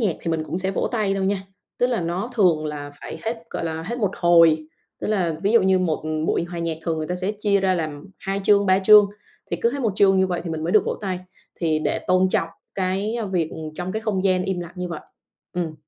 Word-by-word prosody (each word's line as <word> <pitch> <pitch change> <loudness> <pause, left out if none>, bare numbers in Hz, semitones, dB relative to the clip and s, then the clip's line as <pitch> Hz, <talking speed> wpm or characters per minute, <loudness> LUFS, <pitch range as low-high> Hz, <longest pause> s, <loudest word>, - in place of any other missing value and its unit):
nhạc 195 -8 +1
thì 165 - -2
mình 160 -1 -1
cũng 175 - -3
sẽ 190 +1 0
vỗ - - -1
tay 210 -4 +1
đâu 195 -1 -1
nha. 195 0 0 0.4
Tức 245 - +4
là 245 -5 0
nó 175 +8 -2
thường 170 -8 +3
là 145 -1 -5
phải - - -7
hết, 225 +1 -3
gọi - - -3
là, 160 0 -3
hết 240 +3 -3
một 205 -4 +1
hồi. 170 -2 +6 0.4
Tức - - -3
là 180 -7 +1
ví 205 +3 +2
dụ 230 - +6
như 190 0 +4
một 160 -4 -1 0.2
buổi 170 - +1
hòa 175 0 -7
nhạc 165 -1 -2
thường 165 -2 -1
người 155 - -3
ta 180 - -2
sẽ 185 +3 -2
chia 200 -2 +2
ra 190 -1 +2
làm 155 -3 -4
2 195 +1 -2
chương, 200 0 +4
3 190 0 +5
chương, 205 +1 +7 0.4
thì - - 0
cứ 235 - +4
hết 280 - -3
một 220 -5 +1
chương 195 -2 +5
như 190 - +4
vậy 175 -2 -2
thì 170 - -4
mình 160 0 -3
mới 175 - -1
được 215 - +5
vỗ - - -1
tay, 190 -3 -2 0.4
thì 160 -3 0
để - - -1
tôn 185 +1 +4
trọng 165 -2 0 0.3
cái 195 +4 -1 0.2
việc 165 -3 0 0.2
trong 180 +2 -4
cái 220 - -2
không 200 -3 -1
gian 185 -1 +3
im 185 -2 -2
lặng 175 0 -7
như 180 0 -3
vậy. 165 -3 -5 0.5
Ừm. 170 -3 -3
185 Hz, 260 wpm, -23 LUFS, 165-200 Hz, 0.5 s, chương